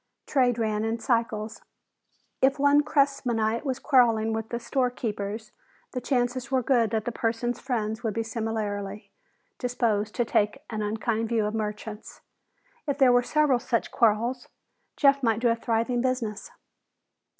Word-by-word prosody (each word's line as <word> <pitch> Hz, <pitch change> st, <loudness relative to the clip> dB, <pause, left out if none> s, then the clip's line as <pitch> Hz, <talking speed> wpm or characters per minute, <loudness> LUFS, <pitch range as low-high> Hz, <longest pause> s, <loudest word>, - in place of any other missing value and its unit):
Trade 250 Hz, -4 st, +2 dB
ran 215 Hz, -2 st, 0 dB
in 225 Hz, +1 st, -1 dB
cycles. 225 Hz, -2 st, -1 dB, 0.8 s
If 270 Hz, +2 st, +4 dB
one 285 Hz, +1 st, +5 dB
Cressmanite 250 Hz, -7 st, +1 dB
was 265 Hz, -3 st, -2 dB
quarreling 230 Hz, -6 st, +3 dB
with 220 Hz, 0 st, -3 dB
the 235 Hz, -, -3 dB
storekeepers, 220 Hz, -5 st, -2 dB, 0.4 s
the 250 Hz, -, -4 dB
chances 245 Hz, -1 st, -1 dB
were 260 Hz, -2 st, +1 dB
good 235 Hz, -3 st, +3 dB
that 220 Hz, 0 st, -1 dB
the 240 Hz, -, -1 dB
person's 230 Hz, +1 st, -1 dB
friends 220 Hz, -3 st, -2 dB
would 220 Hz, -4 st, -2 dB
be 230 Hz, -, 0 dB
similarly 215 Hz, -2 st, -4 dB, 0.5 s
disposed 225 Hz, -4 st, 0 dB
to 240 Hz, -, +1 dB
take 220 Hz, +7 st, 0 dB
an 215 Hz, -1 st, -3 dB
unkind 220 Hz, +1 st, -1 dB
view 225 Hz, -3 st, +1 dB
of 210 Hz, -, -2 dB
merchants. 210 Hz, 0 st, -5 dB, 0.7 s
If 280 Hz, -1 st, 0 dB
there 265 Hz, -3 st, +6 dB
were 245 Hz, 0 st, +5 dB
several 285 Hz, 0 st, +2 dB
such 240 Hz, -2 st, -1 dB
quarrels, 235 Hz, +3 st, +1 dB, 0.5 s
Jeff 280 Hz, -1 st, +4 dB
might 225 Hz, -3 st, +2 dB
do 240 Hz, 0 st, +2 dB
a 230 Hz, -, +3 dB
thriving 230 Hz, +1 st, 0 dB
business. 235 Hz, -5 st, -2 dB
230 Hz, 150 wpm, -26 LUFS, 220-250 Hz, 0.8 s, there